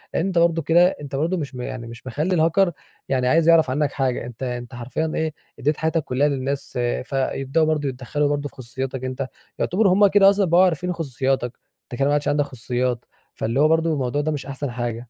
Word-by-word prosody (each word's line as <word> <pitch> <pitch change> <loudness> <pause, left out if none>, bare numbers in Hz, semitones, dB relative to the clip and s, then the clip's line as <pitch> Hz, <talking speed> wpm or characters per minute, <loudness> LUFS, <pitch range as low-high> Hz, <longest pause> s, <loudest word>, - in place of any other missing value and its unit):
أنت 185 +1 0
برضه 170 -1 +3
كده 170 +3 +5
أنت 140 -1 -6
برضه 165 +7 0
مش 145 -5 -5
م 125 - -5
يعني 125 -1 -6
مش 120 +2 -11
مخلي 155 +8 -1
الهاكر 170 +3 +3 0.4
يعني 130 -2 +1
عايز 165 +4 +4
يعرف 165 -4 +5
عنك 145 +2 0
حاجة، 130 -4 -1
أنت 120 +1 -8
أنت 120 -2 -5
حرفيًا 130 +7 -3
إيه 160 -1 -1 0.3
أديت 150 +3 +1
حياتك 160 0 0
كلها 135 +3 +1
للناس 140 0 -2 0.3
فيبدأوا 135 +3 0
برضه 150 -2 0
يتدخلوا 135 +3 -1
برضه 145 0 -1
في - - -25
خصوصياتك 130 +1 -5
أنت، 130 +1 -3 0.3
يعتبروا 190 0 +3
همّ 205 +2 +6
كده 195 0 +6
أصلًا 200 0 +2
بقوا 175 +1 +5
عارفين 180 0 +1
خصوصياتك 135 -5 -2 0.3
أنت 120 - -9
كده 140 - +3
ما 145 - +2
عادش 145 0 0
عندك 145 0 +2
خصوصيات. 125 -1 -2 0.3
فاللي 115 +4 -1
هو 150 - +6
برضه 160 +1 +2
الموضوع 135 0 -1
ده 155 +1 -1
مش 145 -2 -4
أحسن 140 -1 -4
حاجة. 120 -1 -4
145 Hz, 205 wpm, -22 LUFS, 130-160 Hz, 0.4 s, همّ